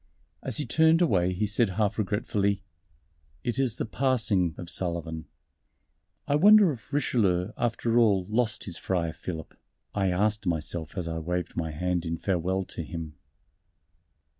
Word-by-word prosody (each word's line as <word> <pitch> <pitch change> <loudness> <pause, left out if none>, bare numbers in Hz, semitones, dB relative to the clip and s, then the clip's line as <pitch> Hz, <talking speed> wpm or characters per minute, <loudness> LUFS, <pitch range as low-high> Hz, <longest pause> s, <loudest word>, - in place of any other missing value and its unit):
As - - 0
he 150 - -1
turned 160 0 +4
away 95 - +3
he 95 +4 -1
said 105 +1 +2
half 105 -1 +1
regretfully, 100 -1 0 0.8
"It 120 +2 -2
is 130 -4 +1
the - - -3
Passing 110 - +1
of 90 - -7
Sullivan." 85 -3 -3 1.0
"I - - +1
wonder 200 +4 +7
if 125 -1 -10
Richelieu, 105 -10 +1
after 120 0 +1
all, 100 -6 +3
lost 110 -1 0
his 85 -4 -4
Friar 85 -4 -1
Philip?" 80 -1 -7 0.4
I 95 -2 +1
asked 105 +2 0
myself 80 +1 -2
as 90 -2 -2
I 80 0 -3
waved 90 +1 -3
my 80 -1 -2
hand 90 +3 -1
in 85 0 -2
farewell 95 +1 0
to 85 - -7
him. 80 -2 -6
95 Hz, 150 wpm, -27 LUFS, 85-115 Hz, 1.0 s, wonder